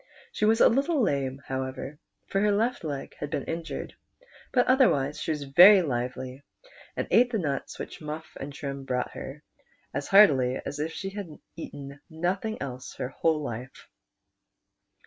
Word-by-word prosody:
She 210 Hz, -, 0 dB
was 225 Hz, +2 st, +4 dB
a -, -, +8 dB
little 280 Hz, +6 st, +2 dB
lame, 140 Hz, -, 0 dB
however, 130 Hz, +2 st, -5 dB, 0.3 s
for 195 Hz, -, -1 dB
her 210 Hz, 0 st, +3 dB
left 225 Hz, +2 st, 0 dB
leg 145 Hz, -3 st, -5 dB
had 145 Hz, -, -4 dB
been 140 Hz, -, -2 dB
injured, 165 Hz, 0 st, -5 dB, 0.6 s
but 250 Hz, -1 st, +3 dB
otherwise 150 Hz, -, +3 dB
she -, -, -4 dB
was 150 Hz, -2 st, -1 dB
ver\' 180 Hz, +8 st, +8 dB
liveh', 130 Hz, -1 st, -3 dB, 0.6 s
and -, -, -1 dB
ate 245 Hz, +2 st, +5 dB
the 225 Hz, -, +1 dB
nuts 145 Hz, -8 st, -3 dB
which -, -, -7 dB
Mufif 155 Hz, +1 st, -7 dB
and 140 Hz, +2 st, -6 dB
Trim 140 Hz, -1 st, -6 dB
brought 125 Hz, -2 st, -2 dB
her, 145 Hz, +3 st, -8 dB, 0.5 s
as 140 Hz, +2 st, -3 dB
heartily 135 Hz, -11 st, +5 dB
as 145 Hz, -, -5 dB
if 155 Hz, +2 st, -2 dB
she 195 Hz, +3 st, -5 dB
had 200 Hz, -2 st, -6 dB, 0.3 s
eaten 140 Hz, -3 st, -8 dB
nothing 185 Hz, +7 st, -2 dB
else 130 Hz, -2 st, -7 dB
all 125 Hz, -, -4 dB
her 165 Hz, -, +4 dB
life. 125 Hz, -2 st, -7 dB
150 Hz, 165 wpm, -27 LUFS, 135-195 Hz, 0.6 s, a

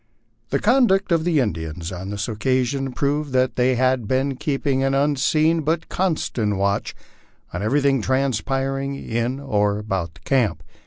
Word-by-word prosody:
The -, -, +1 dB
conduct 215 Hz, -6 st, +3 dB
of 165 Hz, -1 st, +2 dB
the 165 Hz, -4 st, +2 dB
Indians 80 Hz, -, -3 dB
on 95 Hz, +1 st, -6 dB
this 100 Hz, -1 st, -3 dB
occasion 130 Hz, +3 st, 0 dB
proved 145 Hz, +2 st, -1 dB
that 130 Hz, 0 st, +2 dB
they 125 Hz, +1 st, +2 dB
had 130 Hz, -2 st, +1 dB
been 135 Hz, +2 st, 0 dB
keeping 135 Hz, -1 st, -1 dB
an 135 Hz, 0 st, +1 dB
unseen 155 Hz, +3 st, +2 dB
but 160 Hz, +2 st, -1 dB
constant 140 Hz, -, -1 dB
watch 100 Hz, +1 st, -1 dB, 0.6 s
on 90 Hz, -, -3 dB
everything 135 Hz, +3 st, +2 dB
transpiring 135 Hz, +2 st, -1 dB
in 120 Hz, 0 st, -2 dB
or 105 Hz, -7 st, 0 dB
about 95 Hz, -6 st, -3 dB
camp. 120 Hz, -10 st, +1 dB
130 Hz, 145 wpm, -22 LUFS, 105-140 Hz, 0.6 s, conduct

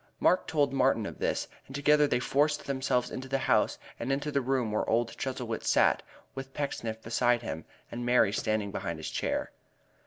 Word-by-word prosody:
Mark 185 Hz, -, +3 dB
told 145 Hz, -3 st, +1 dB
Martin 130 Hz, -5 st, +2 dB
of -, -, -7 dB
this, -, -, 0 dB, 0.2 s
and 135 Hz, -, -9 dB
together 150 Hz, +1 st, +4 dB
they -, -, +2 dB
forced 145 Hz, +4 st, +1 dB
themselves 130 Hz, -2 st, 0 dB
into 130 Hz, +1 st, -5 dB
the 135 Hz, +1 st, 0 dB
house, -, -, +3 dB, 0.2 s
and 120 Hz, +3 st, -2 dB
into 145 Hz, +2 st, -1 dB
the 140 Hz, -, +1 dB
room 125 Hz, -3 st, 0 dB
where 105 Hz, -, 0 dB
old 115 Hz, +1 st, +1 dB
Chuzzlewit 125 Hz, -4 st, -3 dB
sat, -, -, +3 dB, 0.3 s
with 135 Hz, 0 st, -8 dB
Pecksniff 115 Hz, -6 st, -3 dB
beside 120 Hz, +1 st, +2 dB
him, 80 Hz, -7 st, -5 dB, 0.3 s
and 120 Hz, +1 st, -4 dB
Mary 120 Hz, -4 st, +4 dB
standing 110 Hz, -2 st, 0 dB
behind 85 Hz, -4 st, -3 dB
his 80 Hz, -, -5 dB
chair. -, -, -1 dB
125 Hz, 185 wpm, -30 LUFS, 115-140 Hz, 0.3 s, together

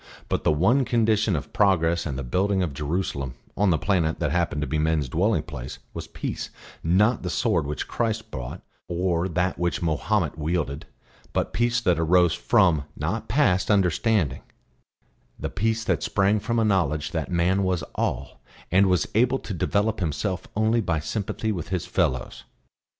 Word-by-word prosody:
But -, -, -1 dB
the -, -, +3 dB
one 95 Hz, -, +3 dB
condition 110 Hz, -5 st, +2 dB
of 75 Hz, 0 st, -5 dB
progress 85 Hz, -5 st, +2 dB
and 65 Hz, -3 st, -4 dB
the 70 Hz, -, -3 dB
building 95 Hz, +9 st, +1 dB
of 80 Hz, -5 st, -3 dB
Jerusalem, 70 Hz, -3 st, -3 dB, 0.2 s
on 100 Hz, 0 st, +2 dB
the 85 Hz, -, +3 dB
planet 85 Hz, -2 st, +1 dB
that -, -, 0 dB
happened 85 Hz, -3 st, 0 dB
to 75 Hz, -, -2 dB
be 80 Hz, -, -1 dB
men's 80 Hz, -2 st, +1 dB
dwelling 95 Hz, -, +1 dB
place, 65 Hz, -6 st, -7 dB, 0.2 s
was -, -, -6 dB
peace, -, -, -5 dB, 0.3 s
not 105 Hz, +8 st, +3 dB
the 90 Hz, -, -3 dB
sword 80 Hz, -2 st, +1 dB
which 75 Hz, -2 st, -4 dB
Christ 110 Hz, -2 st, -2 dB
brought 60 Hz, -2 st, -6 dB, 0.2 s
or 90 Hz, 0 st, 0 dB
that 90 Hz, +2 st, -1 dB
which 85 Hz, +1 st, -1 dB
Mahomet 80 Hz, 0 st, 0 dB
wielded; 75 Hz, -2 st, -2 dB, 0.5 s
but -, -, -1 dB
peace 120 Hz, +1 st, +2 dB
that 90 Hz, -7 st, +2 dB
arose 85 Hz, +1 st, +4 dB
from, 80 Hz, -6 st, +3 dB
not 90 Hz, +10 st, -2 dB
passed, 105 Hz, -7 st, +2 dB
understanding; 95 Hz, -, +2 dB, 1.0 s
the -, -, -4 dB
peace 110 Hz, +2 st, 0 dB
that -, -, 0 dB
sprang 100 Hz, +2 st, +2 dB
from 115 Hz, +3 st, -2 dB
a 115 Hz, -, +3 dB
knowledge 75 Hz, -7 st, +1 dB
that 80 Hz, -3 st, -3 dB
man 90 Hz, +3 st, +2 dB
was 95 Hz, -3 st, 0 dB
all 65 Hz, +2 st, -3 dB, 0.3 s
and 95 Hz, +2 st, +5 dB
was 90 Hz, -1 st, +2 dB
able 125 Hz, +4 st, +3 dB
to 110 Hz, -, -6 dB
develop 105 Hz, +5 st, 0 dB
himself 90 Hz, +2 st, -2 dB
only 110 Hz, +2 st, +2 dB
by 85 Hz, -6 st, 0 dB
sympathy 105 Hz, +6 st, -3 dB
with 90 Hz, -7 st, -4 dB
his 90 Hz, -2 st, -2 dB
fellows. 75 Hz, -9 st, -1 dB
90 Hz, 170 wpm, -25 LUFS, 80-105 Hz, 1.0 s, and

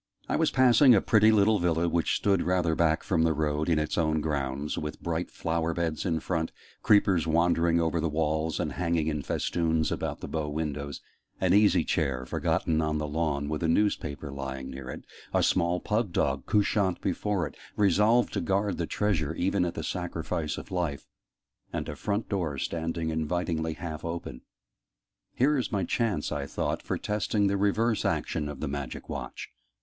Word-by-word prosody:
I -, -, 0 dB
was -, -, +3 dB
passing 130 Hz, 0 st, +6 dB
a -, -, +5 dB
pretty 110 Hz, 0 st, +5 dB
little 105 Hz, 0 st, +4 dB
villa, 85 Hz, -1 st, +1 dB
which 85 Hz, 0 st, +1 dB
stood 100 Hz, -3 st, +2 dB
rather 90 Hz, -2 st, +1 dB
back 80 Hz, 0 st, +2 dB
from 85 Hz, -4 st, +1 dB
the 80 Hz, 0 st, +3 dB
road, 75 Hz, +1 st, 0 dB
in 80 Hz, -, +3 dB
its 75 Hz, +3 st, -1 dB
own 80 Hz, -1 st, +2 dB
grounds, 70 Hz, -1 st, -2 dB
with 75 Hz, 0 st, -5 dB
bright 85 Hz, 0 st, -2 dB
flower 85 Hz, 0 st, -2 dB
beds 85 Hz, 0 st, -1 dB
in 80 Hz, -2 st, +1 dB
front 80 Hz, -3 st, -2 dB, 0.3 s
creepers 100 Hz, -6 st, +4 dB
wandering 85 Hz, +1 st, +3 dB
over 85 Hz, 0 st, +1 dB
the 80 Hz, -, 0 dB
walls 80 Hz, 0 st, 0 dB
and -, -, -1 dB
hanging 85 Hz, -2 st, 0 dB
in 75 Hz, -2 st, -1 dB
festoons 80 Hz, +2 st, 0 dB
about -, -, -3 dB
the -, -, -6 dB
bow 80 Hz, -2 st, -2 dB
windows 75 Hz, -2 st, -4 dB, 0.4 s
an 95 Hz, -1 st, +2 dB
easy 100 Hz, -4 st, +5 dB
chair 70 Hz, -7 st, -1 dB
forgotten 80 Hz, +4 st, 0 dB
on 75 Hz, 0 st, 0 dB
the 75 Hz, 0 st, -2 dB
lawn, 75 Hz, -2 st, -1 dB
with 75 Hz, +1 st, -3 dB
a 85 Hz, -, +1 dB
newspaper 80 Hz, -6 st, 0 dB
lying 65 Hz, -1 st, -5 dB
near 65 Hz, -1 st, -8 dB
it -, -, -8 dB, 0.3 s
a -, -, +3 dB
small 85 Hz, +1 st, +2 dB
pug 105 Hz, -1 st, -1 dB
dog 70 Hz, -5 st, 0 dB
"couchant" 100 Hz, -3 st, +2 dB
before 95 Hz, 0 st, -1 dB
it, -, -, -8 dB, 0.2 s
resolved 105 Hz, +4 st, +3 dB
to -, -, -1 dB
guard 100 Hz, 0 st, 0 dB
the 85 Hz, -, -1 dB
treasure 80 Hz, -7 st, 0 dB
even 95 Hz, +2 st, +1 dB
at 85 Hz, -, -3 dB
the -, -, -4 dB
sacrifice 85 Hz, -3 st, -3 dB
of -, -, -9 dB
life 85 Hz, -6 st, -2 dB, 0.7 s
and -, -, -3 dB
a 75 Hz, -, -5 dB
front 105 Hz, +7 st, -2 dB
door 85 Hz, -8 st, -2 dB
standing 80 Hz, +2 st, -2 dB
invitingly 80 Hz, 0 st, -1 dB
half 80 Hz, -1 st, -6 dB
open. 85 Hz, -7 st, -5 dB, 0.9 s
"Here 140 Hz, +3 st, +3 dB
is 125 Hz, -, -3 dB
my 100 Hz, -3 st, 0 dB
chance," 105 Hz, -4 st, -1 dB
I 70 Hz, -1 st, -3 dB
thought, -, -, -2 dB
"for -, -, -2 dB
testing 105 Hz, 0 st, 0 dB
the 100 Hz, 0 st, +2 dB
reverse 105 Hz, +3 st, +1 dB
action 75 Hz, -2 st, -1 dB
of 70 Hz, -2 st, -7 dB
the 80 Hz, -, -1 dB
Magic 70 Hz, -3 st, -5 dB
Watch!" -, -, -6 dB
85 Hz, 185 wpm, -28 LUFS, 75-95 Hz, 0.9 s, passing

